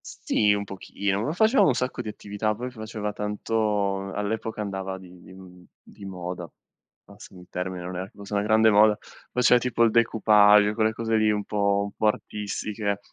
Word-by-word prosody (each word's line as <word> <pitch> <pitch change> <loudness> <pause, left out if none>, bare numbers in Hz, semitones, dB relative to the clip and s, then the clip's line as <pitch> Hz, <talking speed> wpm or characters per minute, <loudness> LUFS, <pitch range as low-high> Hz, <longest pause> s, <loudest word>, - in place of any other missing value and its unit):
S - - -11
sì, 105 -1 +2
un 100 - -2
pochino, 100 0 -3
ma 145 - -1
facevamo 220 +9 +4
un 130 - +2
sacco 125 0 -2
di 115 - -9
attività, 105 +1 -3
poi 125 +3 -6
faceva 110 -2 -5
tanto 105 -2 -1
all'epoca 110 +1 -3
andava 95 -2 -4
di 90 -1 -14
di - - -15
mhmm 90 -1 -14 0.2
di 100 - -13
moda, 90 -3 -6 0.5
passami 100 -2 -14
il 90 - -16
termine, 90 0 -4
non 90 0 -6
è 90 - -3
che 95 - -17
fosse 100 0 -9
una 100 - +2
grande 110 +1 +4
moda, 105 0 +5 0.3
faceva 125 0 +4
tipo 120 -1 +1
il 115 - +4
decoupage, 105 -2 +5
quelle 110 0 +1
cose 115 0 -1
lì 110 0 +3
un 105 -1 0
po' 100 -1 +1
un 100 - -5
po' 110 - +1
artistiche. 105 -1 -3
105 Hz, 190 wpm, -25 LUFS, 100-110 Hz, 0.5 s, moda